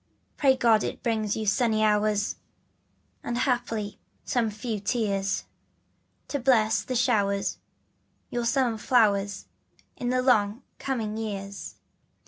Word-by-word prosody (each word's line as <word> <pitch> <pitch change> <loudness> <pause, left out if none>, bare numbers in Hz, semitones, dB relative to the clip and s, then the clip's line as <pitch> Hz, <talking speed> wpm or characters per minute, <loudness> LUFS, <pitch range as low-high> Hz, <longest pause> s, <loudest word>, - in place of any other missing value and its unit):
Pray 270 -2 +4
God 225 -3 +4
it - - -5
brings 220 -4 0
you 220 - -2
sunny 215 +1 +2
hours 210 -1 +2 0.9
And 240 - -2
haply 230 -5 -1 0.3
some 235 -3 +1
few 215 +1 -4
tears 200 -2 -1 0.9
To 285 - -1
bless 220 -4 +2
like 255 - +1
showers 200 -5 +1 0.7
your 240 -1 -1
summer 235 -2 +1
flowers 205 -5 +2 0.5
In 245 - -3
the 255 0 +1
long 220 -2 +2 0.2
coming 225 -5 -2
years. 200 -2 -5
220 Hz, 115 wpm, -27 LUFS, 205-245 Hz, 0.9 s, Pray